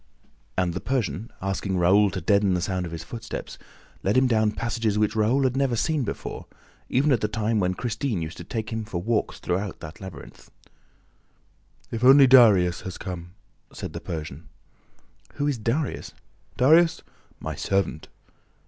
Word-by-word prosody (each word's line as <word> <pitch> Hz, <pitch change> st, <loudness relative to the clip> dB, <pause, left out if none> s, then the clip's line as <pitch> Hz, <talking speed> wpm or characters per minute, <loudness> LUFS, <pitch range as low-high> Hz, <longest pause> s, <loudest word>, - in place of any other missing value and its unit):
And 90 Hz, -2 st, +1 dB
the 95 Hz, -, -3 dB
Persian, 115 Hz, -4 st, -2 dB
asking 95 Hz, 0 st, -2 dB
Raoul 100 Hz, +4 st, +4 dB
to 95 Hz, -1 st, -5 dB
deaden 100 Hz, +2 st, +3 dB
the 90 Hz, -, -1 dB
sound 90 Hz, -1 st, -2 dB
of -, -, -9 dB
his 80 Hz, -1 st, -6 dB
footsteps, 115 Hz, +7 st, -7 dB, 0.4 s
led 100 Hz, +5 st, +1 dB
him 130 Hz, -, +5 dB
down 110 Hz, -3 st, +3 dB
passages 115 Hz, -3 st, -1 dB
which 105 Hz, +1 st, +1 dB
Raoul 115 Hz, +6 st, +2 dB
had 130 Hz, -1 st, +1 dB
never 135 Hz, -3 st, +1 dB
seen 155 Hz, +5 st, 0 dB
before, 110 Hz, -, -6 dB, 0.4 s
even 145 Hz, +4 st, +2 dB
at 120 Hz, -5 st, +2 dB
the 105 Hz, -, +1 dB
time 110 Hz, +1 st, 0 dB
when 90 Hz, -1 st, 0 dB
Christine 115 Hz, 0 st, -2 dB
used 80 Hz, +2 st, -7 dB
to 85 Hz, -, -7 dB
take 110 Hz, +5 st, -4 dB
him 110 Hz, 0 st, -2 dB
for 100 Hz, -5 st, -4 dB
walks 110 Hz, +4 st, -1 dB
through 95 Hz, +2 st, -2 dB
that 80 Hz, +6 st, -10 dB
labyrinth. 90 Hz, -8 st, -11 dB, 1.4 s
"If 115 Hz, +1 st, -4 dB
only 135 Hz, +2 st, +8 dB
Darius 105 Hz, -9 st, +6 dB
has 95 Hz, -, -7 dB
come!" 90 Hz, -1 st, -7 dB, 0.4 s
said -, -, -7 dB
the -, -, -6 dB
Persian. 80 Hz, -2 st, -7 dB, 0.8 s
"Who 145 Hz, -, -2 dB
is 140 Hz, -5 st, -1 dB
Darius?" 125 Hz, +7 st, -2 dB, 0.4 s
"Darius? 160 Hz, +5 st, +4 dB, 0.4 s
My -, -, -4 dB
servant." 95 Hz, -5 st, -1 dB
105 Hz, 165 wpm, -25 LUFS, 90-120 Hz, 1.4 s, only